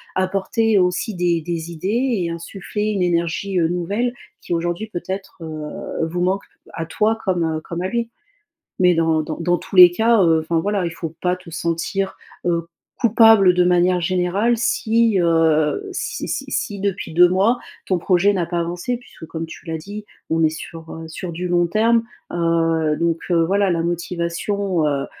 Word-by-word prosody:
apporter 195 +3 +1
aussi 180 +3 0
des 175 -1 +1
des 165 0 -4
idées 210 +6 0
et - - -2
insuffler 190 +5 -4
une 205 -3 -1
énergie, 175 +2 0
heu, 165 -2 +2
nouvelle, 200 +8 -1 0.3
qui - - -4
aujourd'hui 175 +5 -2
peut-être, 190 0 -6
heu, 155 0 -5
vous 175 +2 -4
manque 185 +3 0 0.3
à 165 - -4
toi 215 +6 +1
comme 165 -4 0
comme 170 0 -5
à 185 - 0
lui. 235 +2 -2 0.7
Mais 180 -1 +5
dans 160 -1 +2
dans 155 0 -5
dans 175 +1 +1
tous 190 - -8
les 180 -1 +10
cas, 225 +3 +3
heu, 160 -1 +4
enfin 165 +1 -1
voilà, 200 +2 0
il 170 - -1
faut 165 -1 -6
pas 180 0 +1
te 180 -1 -16
sentir, 170 +4 -2 0.3
heu, 170 -1 0 0.3
coupable 225 -5 +6
de 180 - +4
manière 180 0 +3
générale 185 +6 +1
si, 230 -3 +2
heu, 165 - +2
si - - -4
si - - -4
si 205 -4 -2
depuis 195 -4 -2
2 175 +1 +7
mois, 200 +7 +2 0.3
ton 185 - +1
projet 185 +3 +3
n'a 180 -4 -1
pas 170 +1 -2
avancé 175 +8 -2
puisque 235 -8 -13
comme 160 +1 -5
tu 160 - -12
l'as 160 -1 -3
dit, 205 +6 -8 0.2
on 165 0 +1
est 160 - +5
sur, 160 +1 -8
heu, 160 0 -7
sur 165 +2 -6
du 175 +2 -4
long 175 -1 +2
terme. 225 +5 +3 0.3
Heu, 165 -2 +1
donc 170 -1 0 0.3
voilà, 200 +1 +2
la 165 -1 0
motivation, 175 +2 -1
heu, 140 -1 -1
175 Hz, 180 wpm, -21 LUFS, 165-200 Hz, 0.7 s, les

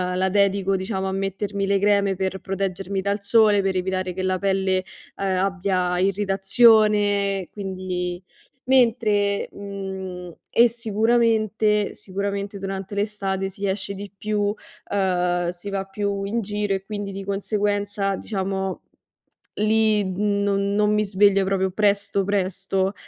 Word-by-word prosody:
la 190 +1 +1
dedico, 195 0 +2
diciamo, 190 0 -2
a - - -2
mettermi 195 +1 -2
le 200 0 +2
creme 200 -1 +2
per 190 0 -2
proteggermi 195 0 -3
dal 200 +2 -1
sole, 210 -1 +4
per 190 -1 0
evitare 185 0 -1
che 185 - -4
la 185 0 0
pelle, 190 -1 +1 0.3
ehm, 190 -1 -1
abbia 185 -1 0
irritazione, 200 0 +3
quindi 185 -3 -4 0.4
mentre 225 -6 +2
mhmm, 190 -3 -6 0.2
e 235 - +6
sicuramente 220 -2 +1
sicuramente 200 +1 -4
durante 195 0 -5
l'estate 200 -2 -2
si 195 +1 -6
esce 200 0 -2
di 200 +1 -8
più, 210 +1 -2 0.5
uhm, 180 -3 +1
si 180 +3 -6
va 195 -1 -1
più 200 0 -3
in 225 +4 -1
giro 205 -1 -1
e 190 - -5
quindi 205 -1 -5
di 195 0 -6
conseguenza, 200 0 -1
diciamo, 190 -2 -3 0.7
lì 215 0 +2
non 200 +1 0
non 210 0 +3
mi 210 0 +2
sveglio 200 0 +4
proprio 190 0 0
presto, 200 0 +1
presto. 195 0 -1
195 Hz, 130 wpm, -23 LUFS, 190-205 Hz, 0.7 s, e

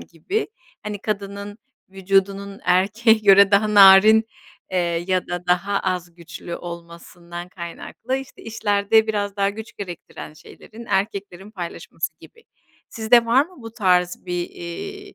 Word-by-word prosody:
gibi. 270 - -4 0.3
Hani, 210 -1 -5
kadının 200 0 -5 0.3
vücudunun 195 +1 -1
erkeğe 210 +5 +3
göre 200 -1 +6
daha 210 +1 +2
narin, 205 +3 +8 0.5
eee, 185 - 0 0.3
ya 185 -1 0
da 175 0 -5
daha 195 +3 +1
az 180 -2 -3
güçlü 170 0 -8
olmasından 170 0 -10
kaynaklı, 185 +8 -6
işte, 270 -1 -9
işlerde 220 0 +1
biraz 205 -2 -2
daha 200 0 +1
güç 220 +2 -10
gerektiren 175 -4 -9
şeylerin 220 +8 -14
erkeklerin 200 -1 -3
paylaşması 175 -5 -6
gibi. 460 - -18 0.4
Sizde 230 +1 +3
var 265 +6 +3
mı 355 -9 -17
bu 225 -1 -9
tarz 180 -5 +1
bir, 175 -1 -3
eee, 395 - -8
200 Hz, 130 wpm, -22 LUFS, 180-220 Hz, 0.5 s, narin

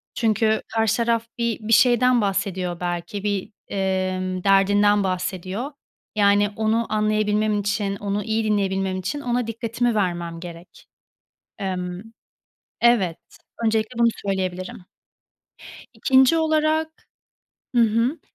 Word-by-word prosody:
Çünkü 220 -1 +1
karşı 225 -2 +2
taraf 230 -1 0
bi 235 -2 -1
bir 220 +1 0
şeyden 245 +1 +5
bahsediyor 190 -3 -2
belki, 175 +3 -4
bir, 205 0 -2 0.2
emm, 185 -1 -2
derdinden 205 +1 +4
bahsediyor. 185 - -3 0.4
Yani, 205 0 +4
onu 220 +1 +1
anlayabilmem 215 0 +1
için, 205 -1 -1
onu 205 0 -3
iyi 220 0 -1
dinleyebilmem 195 -3 0
için 290 +11 -3
ona 245 -2 -1
dikkatimi 230 +1 -1
vermem 175 -4 -2
gerek. 170 0 -11 0.7
Emm 180 -1 -4 0.8
Evet. 210 -9 +3 0.5
Öncelikle 220 +1 0
bunu 235 - +5 0.2
söyleyebilirim. 185 -1 -3 1.1
2'nci 265 +4 +4
olarak 315 0 0 0.7
Hı 240 - +5
hı. 230 +7 +1
210 Hz, 110 wpm, -23 LUFS, 190-230 Hz, 1.1 s, şeyden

